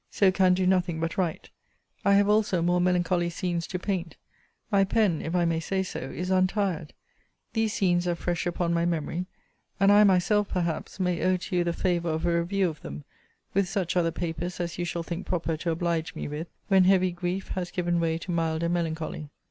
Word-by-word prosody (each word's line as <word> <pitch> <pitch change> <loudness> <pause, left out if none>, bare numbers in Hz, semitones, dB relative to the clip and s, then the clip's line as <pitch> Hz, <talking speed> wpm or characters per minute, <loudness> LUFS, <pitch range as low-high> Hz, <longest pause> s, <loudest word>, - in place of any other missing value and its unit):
So 195 -2 +3
can 185 -1 +4
do 185 0 0
nothing 180 -3 +1
but 165 +1 -2
write. 175 -4 -2 0.5
I 200 0 +5
have 200 0 +4
also 210 -5 +2
more 175 +1 +2
melancholy 175 -1 +1
scenes 170 -1 -2
to 185 - -3
paint. 180 -3 -3 0.5
My 200 -1 +5
pen, 195 -4 +2
if 165 +2 -3
I 175 -1 +3
may 165 -1 +1
say 190 +3 -1
so, 185 - -5
is 180 +1 -4
untired. 185 -3 0 0.6
These 225 -2 +1
scenes 175 -2 +1
are 175 - +1
fresh 175 +1 -2
upon 175 -1 0
my 170 0 +1
memory: 170 +1 -2 0.5
and 195 0 +5
I 205 +1 +7
myself, 200 +2 +3
perhaps, 170 +1 -2
may 180 -2 0
owe 185 0 +3
to 180 - -5
you 175 - +3
the 170 - 0
favour 175 -1 0
of 160 +1 -1
a 170 -1 +2
review 190 +3 +1
of 155 -3 -6
them, 70 +1 -7 0.5
with 195 -1 +1
such 190 -4 -1
other 170 -2 +3
papers 175 +1 -4
as 175 0 -3
you 175 - 0
shall 170 -1 -3
think 170 +3 -5
proper 170 -2 -1
to 170 +2 -3
oblige 165 -1 -1
me - - -4
with, 150 +3 -5 0.2
when 190 -2 +5
heavy 185 -1 +4
grief 175 +2 -3
has 180 -1 -3
given 175 -1 0
way 165 -1 +1
to 180 +2 -6
milder 165 0 0
melancholy. 160 -3 -3
175 Hz, 205 wpm, -27 LUFS, 170-185 Hz, 0.6 s, I